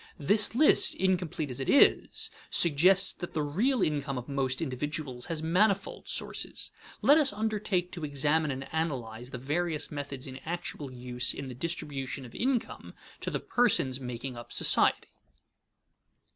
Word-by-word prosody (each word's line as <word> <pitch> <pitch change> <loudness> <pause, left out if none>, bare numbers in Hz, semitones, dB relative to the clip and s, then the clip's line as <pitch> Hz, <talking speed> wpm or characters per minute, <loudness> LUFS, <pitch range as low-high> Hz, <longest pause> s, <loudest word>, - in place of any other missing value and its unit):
This 205 +9 +3
list, 300 +4 +5
incomplete 175 -6 -1
as 125 - -5
it 135 - -3
is, 280 - +3 0.2
suggests 180 +4 +4
that 175 - -8
the 155 - -1
real 210 - +1
income 140 -3 -1
of 125 - -6
most 135 -2 -1
individuals 135 -2 -4
has 160 -2 -4
manifold 195 +4 0
sources. - - -3 0.3
Let 290 +3 +6
us 285 -3 +3
undertake 205 -4 -1
to 170 - -7
examine 150 +2 +1
and 135 -1 -5
analyze 125 -7 -3
the 130 - -6
various 150 +5 -2
methods 140 -2 -6
in 130 -2 -7
actual 165 -3 -6
use 125 0 -1
in 135 -1 -6
the - - -7
distribution 135 -2 -4
of 120 - -13
income 255 -1 -2 0.2
to - - -4
the - - -2
persons 140 - +2
making 125 0 -6
up 120 0 -10
society. - - +4
150 Hz, 150 wpm, -29 LUFS, 130-180 Hz, 0.3 s, Let